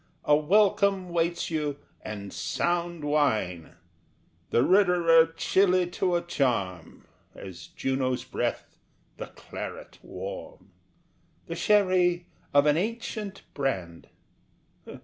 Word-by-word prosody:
A 150 - +5
welcome 195 +3 +2
waits 170 0 -1
you, 150 -3 -2 0.2
and 100 -2 -7
sound 175 -2 -2
wine 110 - 0 0.7
The 120 - +3
Roederer 175 -3 +5
chilly 185 0 +3
to 180 -1 0
a 170 - 0
charm, 100 - -2 0.3
As 95 -3 -10
Juno's 130 -1 -2
breath - - -4 0.4
the - - -6
claret - - -9
warm, - - -8 0.7
The - - -5
sherry 185 -4 +3 0.3
of 145 0 +4
an 150 0 +4
ancient 215 0 -4
brand. 95 -12 -3
170 Hz, 100 wpm, -27 LUFS, 135-185 Hz, 0.7 s, A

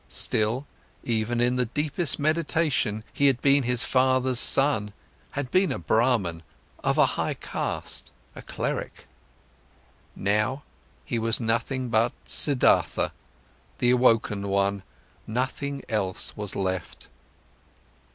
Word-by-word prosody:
Still, 110 +6 0 0.4
even 115 +1 -1
in 125 +1 +2
the 125 -1 +1
deepest 150 +4 0
meditation, 155 -8 0
he 140 - +3
had 135 -3 +2
been 140 +1 +4
his 125 -1 +2
father's 130 -1 +2
son, 135 -8 +3 0.4
had 140 -3 -4
been 185 +1 +3
a - - -2
Brahman, 100 -2 +1 0.4
of - - +1
a - - +6 0.2
high - - -2
caste, - - -5 0.2
a - - -9
cleric. - - -5 1.1
Now, 105 +8 0 0.4
he 115 - -2
was 115 0 +1
nothing 120 +2 -1
but 115 +1 +2
Siddhartha, 140 -4 +2 0.7
the 120 - +3
awoken 115 -5 +2
one, 100 0 0 0.5
nothing 130 +4 -3
else 100 -5 -2
was 105 -2 -2
left. 95 -3 -4
120 Hz, 115 wpm, -25 LUFS, 105-135 Hz, 1.1 s, a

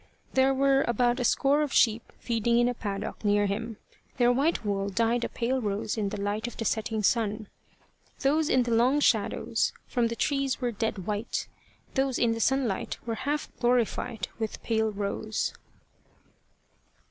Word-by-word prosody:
There 265 +1 +4
were 270 0 +3
about 240 +1 +2
a - - 0
score 275 +4 +3
of 295 -2 -1
sheep 225 -1 +2
feeding 235 0 0
in 240 0 +4
a 245 - 0
paddock 205 -3 -5
near 205 0 +3
him, 220 +2 -3 0.4
their 245 -1 +4
white 275 0 +1
wool 200 -1 -1
dyed 230 +4 +1
a - - -2
pale 255 +2 -1
rose 210 0 -2
in 210 -3 -1
the 210 - -5
light 205 +3 -2
of 240 - -8
the 225 - -3
setting 220 0 -1
sun. 215 -1 +1 0.7
Those 300 +3 +2
in 255 - +4
the 235 -1 -1
long 250 +5 +4
shadows - - +1
from 240 -2 0
the 230 - -4
trees 275 0 0
were 245 -2 -1
dead 210 -4 -3
white; 210 +2 -2 0.5
those 265 -2 +1
in 235 - +2
the 225 - -2
sunlight 260 -5 0
were 230 - -2 0.2
half 295 0 -2
glorified 240 -3 0
with 220 -1 -4
pale 220 -1 +1
rose. 210 +1 -2
230 Hz, 170 wpm, -28 LUFS, 215-255 Hz, 0.7 s, There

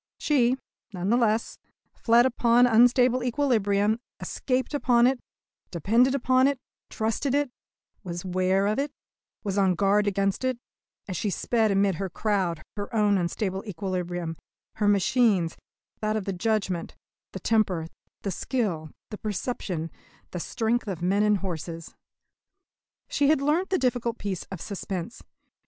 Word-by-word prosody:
She, 260 -4 +2 0.4
none 185 +2 -1
the - - +5
less, 230 -2 +1 0.3
fled 235 +1 +4
upon 245 -1 +4
unstable 245 +1 +4
equilibrium, 220 -5 +1 0.2
escaped 260 +2 -2
upon 245 -4 +4
it, 260 0 +2 0.5
depended 230 - +2
upon 255 0 +3
it, 280 -1 0 0.3
trusted 225 +5 -1
it, 285 -3 +1 0.5
was 175 -1 -5
'ware 185 +1 +1
of 210 +4 +1
it, 285 +1 -1 0.5
was 200 -1 -1
on 190 -2 +3
guard 205 +3 +2
against 195 +2 0
it, 255 -1 0 0.5
as 185 - -4
she 205 - -1
sped 220 +3 +1
amid 195 -3 +2
her 195 - -2
crowd 185 -5 -1
her 205 -1 -5
own 210 -2 +3
unstable 190 +2 -2
equilibrium, 175 -3 -3 0.4
her 210 - +1
machine's, 200 -3 +3 0.4
that 215 0 -1
of 205 - -4
the 195 - -2
judgment, 190 -2 -1 0.4
the - - -5
temper, 195 -7 +1 0.4
the 200 - -2
skill, 185 - -2 0.2
the 210 - -6
perception, 195 -6 -3 0.4
the 180 - -4
strength 225 +6 -1
of 180 -4 -4
men 195 +3 +2
and 210 -1 +3
horses. 170 -3 -6 1.1
She 285 - +1
had 310 -1 +4
learnt 305 +7 +1
the 375 - +2
difficult 245 -4 0
peace 195 -3 -4
of 190 -4 -7
suspense. 190 0 -5
210 Hz, 145 wpm, -26 LUFS, 185-245 Hz, 1.1 s, the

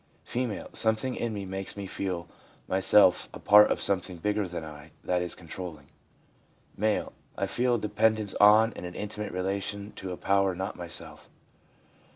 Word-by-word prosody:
F. 120 -4 -3
' - - -29
Some 110 0 +3
thing 125 +3 -3
in 120 - -2
me 100 -2 -5
makes 95 +1 -5
me 100 - -5
feel 90 -3 -4 0.4
myself 95 0 +4
a - - -8
part 105 +1 +7
of - - 0
something 90 -2 -1
bigger 105 +3 -1
than 85 -2 -6
I 75 0 -11
that 90 -1 0
is 90 - -2
controlling/ 85 -1 -8 0.9
M. 105 - -8
l 110 -1 +1 0.2
I - - 0
feel 120 +5 +1
a - - -1
depend 110 +1 +2
ence 105 -2 -3
on 110 +2 +7
and - - -8
an 90 0 -7
intimate 105 0 -5
relation 100 +2 -3
to 95 -1 -5
a 90 - -5
power 100 -1 +2
not 95 +3 -4
my 85 - -7
self.' 85 - -8
100 Hz, 190 wpm, -28 LUFS, 90-105 Hz, 0.9 s, part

